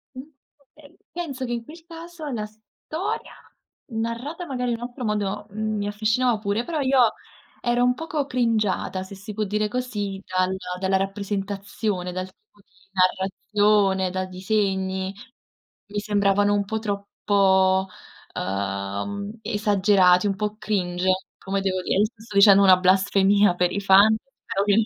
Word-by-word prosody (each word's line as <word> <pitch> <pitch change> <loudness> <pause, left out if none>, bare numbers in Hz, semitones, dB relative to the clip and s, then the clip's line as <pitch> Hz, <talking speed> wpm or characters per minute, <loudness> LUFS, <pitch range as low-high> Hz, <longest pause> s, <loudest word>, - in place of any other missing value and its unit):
Mh, - - -7 0.6
eh, 290 -2 -18
penso 285 -7 -4
che 240 - -5
in 235 - -3
quel 325 +6 -13
caso 335 -1 -9
la 215 -3 -3
storia 220 - -6 0.6
narrata 235 +10 -3
magari 250 -4 -2
in 230 - -1
un 235 - -9
altro 250 +1 -9
modo, 210 -1 -2
mhmm, 215 +1 -3
mi 205 0 -2
affascinava 220 +3 +1
pure, 205 +2 -1
però 315 +2 -3
io 260 -4 +4 0.5
ero 240 0 +1
un 250 0 +4
poco 310 0 -3
cringiata, 220 -7 0
se 195 +1 -10
si 210 +3 -9
può 215 +1 -1
dire 210 +1 0
così, 205 -5 -3
dalla 185 0 0 0.2
dalla 190 0 +2
rappresentazione, 195 -1 -3
dal 185 +1 -3
tipo 205 +2 -26
di - - -39 0.2
narrazione, 190 +1 +2
dai 185 0 -3
disegni. 190 0 -1 0.7
Mi 205 0 -3
sembravano 205 -1 +2
un 205 -1 +1
po' 220 +2 -2
troppo, 195 -2 +2 0.5
ehm, 100 - -3
esagerati, 200 -3 +3
un 195 - 0
po' 210 +1 -3
cringe, 185 -4 -1 0.3
come 195 0 -2
devo 185 -1 -1
dire, - - 0
io 210 - +5
sto 220 -1 -10
dicendo 200 0 +7
una 185 -1 +7
blasfemia 195 +1 +3
per 180 0 +1
i 200 - -2
fan, 200 +3 +6 0.3
però 195 - -1
ovviame 205 +2 +3
205 Hz, 150 wpm, -24 LUFS, 190-225 Hz, 0.7 s, dicendo